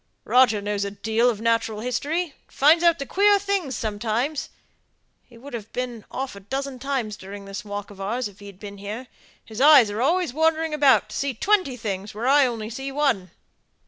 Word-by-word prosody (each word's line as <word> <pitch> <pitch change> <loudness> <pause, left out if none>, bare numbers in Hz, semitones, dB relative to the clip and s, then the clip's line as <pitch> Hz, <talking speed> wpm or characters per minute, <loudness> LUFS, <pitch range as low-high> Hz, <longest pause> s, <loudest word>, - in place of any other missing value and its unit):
Roger 245 -5 +4
knows 205 0 -1
a 200 - -2
deal 220 +4 +1
of 220 -4 -2
natural 225 -1 0
history, 280 +9 -1
and 325 -6 -13
finds 315 +5 +4
out 330 -5 +3
queer 405 +1 +4
things 390 -9 -2
sometimes. 230 +7 -2 0.8
He'd 250 +3 -13
have 225 -2 -7
been 245 -3 -4
off 265 -4 -5
a - - -9
dozen 265 +5 -5
times 255 -6 -2
during 200 +1 -10
this 195 0 -6
walk 205 0 -6
of 195 -1 -11
ours, 235 +5 -2
if 205 -1 -16
he'd 200 -2 -12
been 200 -1 -9
here: 210 +6 -6 0.4
his 220 +2 -6
eyes 275 -7 +7
are 210 +3 -3
always 330 +1 +1
wandering 320 +1 +1
about, 285 -3 +5
and - - -19
see 280 -1 -2
twenty 370 - +1
things 205 -3 -5
where 225 +3 -4
I 280 0 +5
only 225 -2 -5
see 270 +4 -5
one. 270 -10 0
245 Hz, 190 wpm, -24 LUFS, 210-280 Hz, 0.8 s, eyes